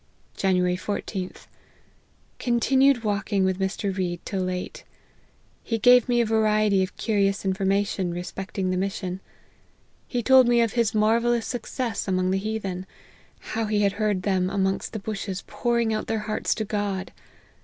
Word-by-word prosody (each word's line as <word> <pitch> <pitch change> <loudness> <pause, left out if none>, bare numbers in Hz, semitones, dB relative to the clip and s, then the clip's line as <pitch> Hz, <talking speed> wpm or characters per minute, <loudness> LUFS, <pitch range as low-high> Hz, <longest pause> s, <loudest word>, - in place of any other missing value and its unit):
"January 180 -2 +2
14th. 190 -1 -5 0.9
Continued 260 +1 +3
walking 205 -2 0
with 190 0 0
Mr. 195 0 -2
Read 175 -2 -2
till 195 -2 -2
late. 185 0 -4 0.8
He 230 - -1
gave 245 +2 +5
me 240 -1 +3
a - - +2
variety 215 -2 +2
of 185 - -3
curious 200 -2 0
information 195 -1 0
respecting 185 +2 -4
the 185 - 0
mission. 190 -1 -3 0.9
He 245 -2 -2
told 260 +1 +6
me 240 0 +4
of 230 -2 +1
his 230 -3 +1
marvellous 230 +2 +2
success 240 -2 -3
amongst 185 -1 +1
the 190 - +1
heathen; 195 -3 -4 0.7
how 225 0 0
he 210 -1 +1
had 200 -1 +3
heard 205 -2 -1
them 185 -2 +1
amongst 195 +1 -1
the - - -2
bushes 195 -2 -4
pouring 235 -2 0
out 215 - -3
their 225 -1 -1
hearts 215 - -1
to 215 - -2
God. 200 -2 -2
205 Hz, 150 wpm, -25 LUFS, 190-225 Hz, 0.9 s, told